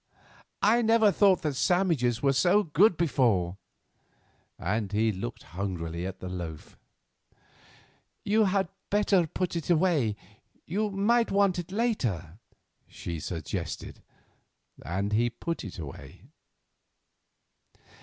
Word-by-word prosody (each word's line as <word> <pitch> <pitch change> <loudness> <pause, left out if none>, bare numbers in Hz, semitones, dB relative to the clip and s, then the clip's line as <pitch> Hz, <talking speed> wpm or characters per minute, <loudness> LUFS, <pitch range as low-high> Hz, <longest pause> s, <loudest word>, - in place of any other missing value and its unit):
I 230 +4 +5
never 225 -2 +4
thought 195 -3 +3
that 150 -2 0
sandwiches 155 - +1
were 140 -1 +4
so 185 +9 +4
good 175 +3 +3
before;" 110 - +1 1.0
and 100 +2 -2
he 110 +1 +2
looked 95 - -6
hungrily 85 -1 -4
at 95 0 -7
the 90 - -7
loaf. 85 -4 -7 1.5
"You 215 +1 +3
had 190 -1 +1 0.2
better 200 -4 +3
put 180 +3 -3
it 170 -1 -4
away; 160 - +2 0.5
you 210 +5 -1
may 220 +4 +2
want 195 -3 +2
it 175 +1 -7
later," 120 - -1 0.5
she 85 -2 -6
suggested. 80 -1 -5 0.8
And 95 +8 -2
he 120 +3 +3
put 165 +8 -5
it 100 - -8
away. 75 -5 -9
145 Hz, 115 wpm, -28 LUFS, -, 1.5 s, I